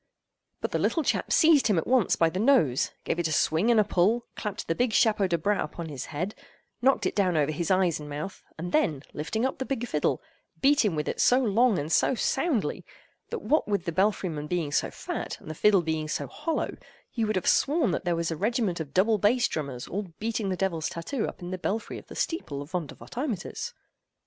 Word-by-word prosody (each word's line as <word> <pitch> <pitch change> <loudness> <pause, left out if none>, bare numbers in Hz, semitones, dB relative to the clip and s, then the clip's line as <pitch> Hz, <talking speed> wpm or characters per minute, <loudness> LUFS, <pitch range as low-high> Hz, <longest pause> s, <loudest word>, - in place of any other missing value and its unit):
But - - -2
the - - 0
little 325 - +1
chap - - 0
seized 315 -5 +5
him 205 -5 +2
at 160 - 0
once 250 -5 +3
by 165 -1 +3
the 185 - -3
nose; 215 - +3
gave 170 - -1
it 170 - +1
a - - -4
swing 160 +7 +2
and 235 -2 +5
a - - +6
pull; 210 +4 +2
clapped 210 -3 -5
the 165 - +1
big 240 +5 0
chapeau 210 -3 +3
de 170 -2 +1
bras 200 +6 +1
upon 160 +2 -6
his 135 -3 -5
head; 180 +7 -3 0.5
knocked 265 +2 +3
it - - -1
down 185 -5 +2
over 150 0 +2
his 165 +2 -2
eyes 185 -4 +2
and 150 -1 -8
mouth; 150 +6 -6
and 175 +2 -5
then, 155 - +1
lifting 220 +11 -2
up 265 - -2
the - - 0
big 255 -3 -3
fiddle, - - 0 0.4
beat 285 +1 +4
him 200 -7 +1
with 150 -1 -2
it - - -1
so 250 - +5
long 235 -2 +3
and 145 +2 -3
so 260 - +3
soundly, 270 - 0 0.5
that - - -5
what 310 - +2
with 200 -3 -1
the 170 - -1
belfry 195 +2 +1
man 150 -3 -4
being 165 -3 -1
so - - +1
fat, - - -5
and 155 - -8
the - - -4
fiddle 195 +2 +4
being 160 -1 -2
so 155 - -2
hollow, 330 - -3 0.4
you 225 -3 0
would 215 - 0
have 185 - -1
sworn 290 - +3
that - - -2
there 175 -2 +1
was 165 0 -1
a - - -1
regiment 210 -1 0
of 145 -3 -6
double 210 +3 +3
bass 225 +5 +3
drummers 140 -5 -4
all 200 +1 -3
beating 220 -2 -2
the 185 - -1
devil's 170 -5 -1
tattoo 215 +9 -3
up - - -8
in 175 - -5
the 185 - -4
belfry 215 +5 -3
of - - -17
the - - -10
steeple 145 - -3
of 145 - -16
Vondervotteimittiss. 220 - -4
190 Hz, 230 wpm, -27 LUFS, 160-235 Hz, 0.5 s, a